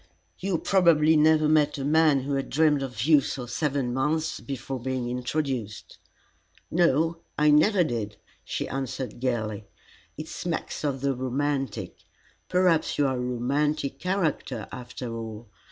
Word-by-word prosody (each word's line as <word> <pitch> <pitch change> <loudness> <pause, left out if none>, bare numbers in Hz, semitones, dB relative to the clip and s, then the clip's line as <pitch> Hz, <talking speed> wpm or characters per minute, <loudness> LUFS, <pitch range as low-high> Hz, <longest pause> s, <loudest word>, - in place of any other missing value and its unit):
"You 190 -2 0
probably 160 -4 +4
never 155 0 +4
met 150 -1 +3
a 135 - -3
man 155 -2 +4
who 140 +2 -3
had 135 0 -2
dreamed 150 -2 +3
of 125 -5 -4
you 150 0 +6
for 125 -2 -5
seven 135 -1 -1
months 150 +5 0
before 135 -1 -5
being 130 0 -2
introduced." 125 -4 -3 0.7
"No, 165 0 +2 0.2
I 150 0 +4
never 180 +6 +5
did," 110 -8 -3 0.3
she - - -3
answered 130 -2 -4
gaily. 110 -5 -2 0.5
"It 155 +1 -6
smacks 170 -2 -4
of 135 -3 -1
the 140 0 +1
romantic. 135 -1 -2 0.5
Perhaps 180 -3 +2
you 145 - +3
are 130 -1 +1
a - - -2
romantic 135 +4 -1
character, 185 -5 -1
after 125 -2 -6
all. 110 0 -7
140 Hz, 140 wpm, -26 LUFS, 125-155 Hz, 0.7 s, you